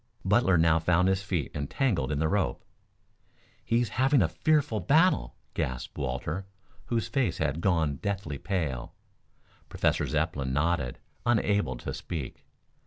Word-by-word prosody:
Butler 95 -2 +4
now 80 0 +4
found 90 +2 +3
his 95 0 +2
feet 95 -7 -2
entangled 75 - 0
in 75 - 0
the 80 +2 +1
rope. 100 +4 -1 1.0
"He's 115 -1 +1
having 135 -4 +5
a - - +3
fearful 145 - +1
battle!" 145 - +3 0.2
gasped 65 -1 -3
Walter, 75 +8 -3 0.4
whose 115 -1 -1
face 125 - 0
had 75 +1 -1
gone 80 -7 +1
deathly 95 -8 -3
pale. 80 -10 -3 0.7
Professor - - +1
Zepplin 75 -4 -1
nodded, 75 -3 0 0.3
unable 105 - +1
to - - -5
speak. 80 -7 -6
85 Hz, 130 wpm, -28 LUFS, 75-105 Hz, 1.0 s, having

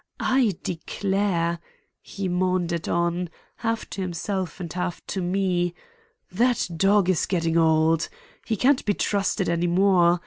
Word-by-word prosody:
I 245 -9 +2
declare," 180 -1 -1 0.4
he 195 -1 -5
maundered 180 -2 0
on, 170 +1 0 0.3
half 225 -1 -2
to 195 - -4
himself 185 -1 -3
and 170 -3 -6
half 180 -1 -3
to 190 - -3
me, 180 -1 0 0.6
"that 240 +6 +2
dog 195 +2 +3
is 185 -3 +1
getting 165 -3 0
old. 160 0 +3 0.3
He 225 - -1
can't 260 +6 +3
be 205 -2 +1
trusted 200 -1 0
any 170 +1 +1
more. 175 -1 +4
180 Hz, 135 wpm, -25 LUFS, 170-200 Hz, 0.6 s, more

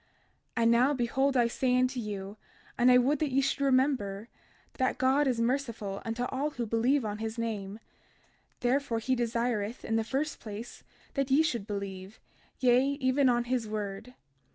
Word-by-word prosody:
32:22 230 - +2
And 230 - +5
now, 250 +5 +4
behold, 265 +2 +1
I 240 - +4
say 250 +1 +1
unto 255 0 +1
you, 205 -2 -5 0.4
and 245 +1 +5
I 250 - +7
would 270 +4 +2
that 305 - 0
ye 265 - +3
should 275 +1 0
remember, 255 -6 +1 0.5
that 260 0 +1
God 270 +3 +3
is 250 -3 0
merciful 230 -5 -2
unto 230 +2 -3
all 270 +4 -1
who 245 -5 -4
believe 230 +4 +1
on 210 0 -4
his 225 +1 -4
name; 210 -3 -3 0.8
therefore 245 -1 +1
he 240 +4 0
desireth, 235 -2 -1
in 225 - 0
the 225 - +1
first 275 +6 -2
place, 220 +2 -8 0.3
that 275 -1 -1
ye 280 +4 +5
should 235 -10 -2
believe, 200 -1 -6 0.4
yea, 255 +2 +4
even 260 0 +3
on 240 -1 +2
his 240 -2 -1
word. 210 +3 -5
240 Hz, 175 wpm, -29 LUFS, 220-265 Hz, 0.8 s, I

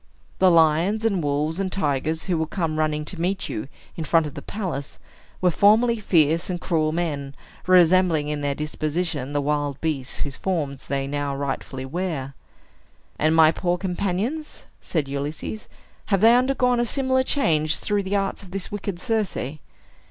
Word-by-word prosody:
The 190 - +6
lions, 170 +6 +3
and 200 -5 +1
wolves, 150 +3 -1
and 190 -1 -1
tigers, 155 -2 0
who 185 - 0
will 160 -1 -1
come 160 -3 -2
running 150 -1 0
to 170 +1 -5
meet 190 +3 -1
you, 105 - -4 0.3
in 165 - -4
front 165 0 +3
of 150 - -6
the 140 - -7
palace, 170 -9 -5 0.4
were 180 -1 +4
formerly 225 +6 +4
fierce 165 -4 +2
and 180 -1 -2
cruel 155 -3 0
men, 145 -5 -3 0.3
resembling 180 -3 +4
in 150 -1 -2
their 140 -1 -1
disposition 150 -1 -2
the 145 0 0
wild 145 -1 -1
beasts 145 -5 -2
whose 140 -2 -3
forms 150 -8 -3
they 135 0 -1
now 140 0 -2
rightfully 135 -1 -4
wear." 145 -3 -3 0.9
"And 155 +1 +3
my 160 -1 +7
poor 175 +1 -1
companions," 195 - -3 0.2
said 155 -5 -2
Ulysses. 145 +9 -5 0.4
"Have 195 -2 +2
they 230 +2 +7
undergone 250 -1 +2
a 240 - +2
similar 260 +1 +1
change, 155 - +1
through 205 -1 0
the 195 +1 -2
arts 195 -1 -1
of 190 - -12
this 195 +1 -4
wicked 200 -3 -4
Circe?" 220 -2 -1
165 Hz, 165 wpm, -24 LUFS, 150-195 Hz, 0.9 s, my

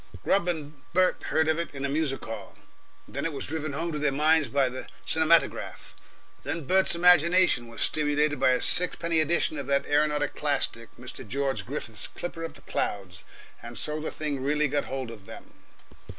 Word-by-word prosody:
Grubb 195 -3 +2
and 150 -4 -4
Bert 185 +1 +2
heard 160 0 +1
of 160 +1 +1
it 170 -4 -5
in 135 0 -3
a - - +1
music 140 -1 -2
hall, 110 -2 -8 0.5
then - - -5
it 165 - -1
was 140 - -5
driven 155 -1 -4
home 165 +4 -2
to 150 - -3
their 145 -1 +1
minds 150 +1 +3
by 135 +2 +2
the 130 +1 -7 0.2
cinematograph, 160 +1 +1 0.5
then 165 - -4
Bert's 190 +3 +3
imagination 175 -6 +4
was 115 -1 -8
stimulated 150 0 +1
by - - +4
a 125 0 +2
sixpenny 170 -2 +3
edition 155 -1 +1
of 140 - -6
that 140 0 +1
aeronautic 150 0 +1
classic, 140 -5 -1
Mr. 125 -1 -10
George 135 +3 -2
Griffith's 115 -7 -5
"Clipper 170 -1 -7
of 165 - -6
the - - -14
Clouds," 90 -4 -4 0.4
and 120 0 -8
so 150 +6 +1
the 155 - -3
thing 145 -3 -4
really 150 +2 +1
got 145 +1 -1
hold 130 -3 -5
of 105 -4 -13
them. - - -12
150 Hz, 185 wpm, -27 LUFS, 135-160 Hz, 0.5 s, imagination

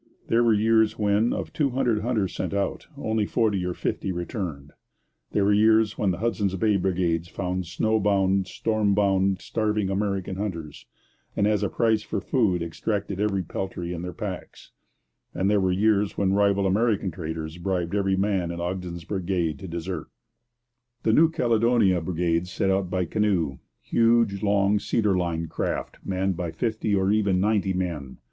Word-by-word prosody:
There 115 +1 +4
were 115 - +4
years 110 +1 +3
when, 105 +2 +2
of - - -4
two 145 -3 +1
hundred 120 -4 +1
hunters 110 -5 -1
setting 95 +1 -2
out, 100 -1 -2
only 110 -5 -1
forty 105 -5 +1
or 90 -1 -2
fifty 95 - -2
returned; 85 - -5 0.6
there 100 - +2
were 105 - +4
years 110 0 +4
when 100 - 0
the 90 - -1
Hudson's 100 -2 -1
Bay 105 +2 +2
brigades 90 -3 0
found 90 -1 -3
snow 110 +5 +1
bound, 95 -1 +2
storm 110 -3 0
bound, 95 -2 +2
starving 105 -3 -1
American 95 -2 -2
hunters, 85 -8 -5 0.5
and 100 - +2
as 105 -1 +2
a 100 - 0
price 110 -2 +2
for 105 -1 -3
food 95 -5 +1
exacted 100 +3 -3
every 100 -2 0
peltry 90 0 -4
in 85 - -5
the 90 0 -5
packs; - - -7 0.6
and 95 +3 +1
there 105 -1 +3
were 95 -1 +2
years 105 +1 +2
when 95 -1 +2
rival 100 -1 +2
American 100 0 +1
traders 80 -1 -6
bribed 90 -1 -2
every 95 -2 +1
man 95 -3 0
in 85 0 -5
Ogden's 90 -1 -4
brigade 90 -6 -2
to 95 - -7
desert. 85 0 -5 1.0
The 110 - +3
New 160 +6 +6
Caledonia 115 - +2
brigades 85 +1 -1
set 95 +1 0
out 95 -1 0
by 90 0 0
canoe 90 - 0 0.2
huge, 115 -3 +2
long, 100 0 +2
cedar 105 -1 +1
lined 85 -2 -2
craft - - -3
manned 95 0 -1
by 85 0 -3
fifty 110 +4 -1
or 95 0 +2
even 100 -3 +2
ninety 100 -1 +1
men. 85 -8 -4
95 Hz, 165 wpm, -25 LUFS, 90-105 Hz, 1.0 s, New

